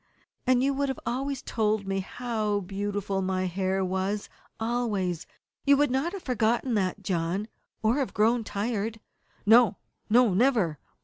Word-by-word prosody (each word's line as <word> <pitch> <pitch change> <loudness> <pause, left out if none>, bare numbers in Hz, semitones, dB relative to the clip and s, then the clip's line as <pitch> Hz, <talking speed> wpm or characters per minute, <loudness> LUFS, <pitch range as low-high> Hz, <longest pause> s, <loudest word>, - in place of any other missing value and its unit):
"And 255 0 +4
you 275 +1 +2
would 275 0 0
always 270 +2 -2
have - - -37
told 215 -2 0
me 195 0 -1
how 215 0 -2
beautiful 200 0 -2
my 185 0 0
hair 190 +1 0
was 190 +3 -2 0.3
always. 215 -7 -1 0.4
You 280 0 +5
would 290 -2 +3
not 270 +8 0
have 390 - -6
forgotten 240 0 +1
that, 190 -4 0
John 180 +3 -1 0.4
or 225 +5 +3
have 275 -3 -1
grown 225 +2 +2
tired?" 220 +1 -2 0.5
"No, 225 0 +6 0.3
no 235 -2 +5
never!" 210 - +2
215 Hz, 145 wpm, -27 LUFS, 195-245 Hz, 0.5 s, No